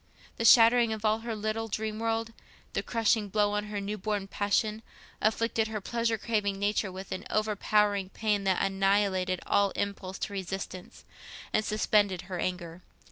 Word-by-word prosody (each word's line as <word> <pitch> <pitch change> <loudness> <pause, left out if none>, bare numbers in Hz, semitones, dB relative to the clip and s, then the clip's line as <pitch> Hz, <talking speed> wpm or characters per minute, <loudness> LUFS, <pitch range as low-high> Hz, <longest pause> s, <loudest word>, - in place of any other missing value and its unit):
The 230 - -1
shattering 230 0 +7
of 220 0 -5
all 215 +1 +3
her 230 0 -4
little 215 +1 -2
dream 215 0 -3
world, 225 0 -1 0.4
the - - 0
crushing 225 -2 +1
blow 205 +1 +2
on 210 0 -1
her 210 -1 -4
new 205 +1 -4
born 205 0 -2
passion, 210 +2 0 0.4
afflicted 225 +1 +1
her 220 -1 -4
pleasure 230 +2 -1
craving 210 -3 -1
nature 205 0 0
with 190 +1 -9
an - - -4
overpowering 210 -2 +1
pain 210 -1 -1
that 190 -1 +2
annihilated 195 -1 +1
all 200 0 +3
impulse 195 -2 -3
to 205 - -9
resistance, 190 -1 -6 0.5
and 215 - +2
suspended 205 -3 +1
her 180 -1 -6
anger. 175 -1 -4
210 Hz, 160 wpm, -29 LUFS, 195-220 Hz, 0.5 s, shattering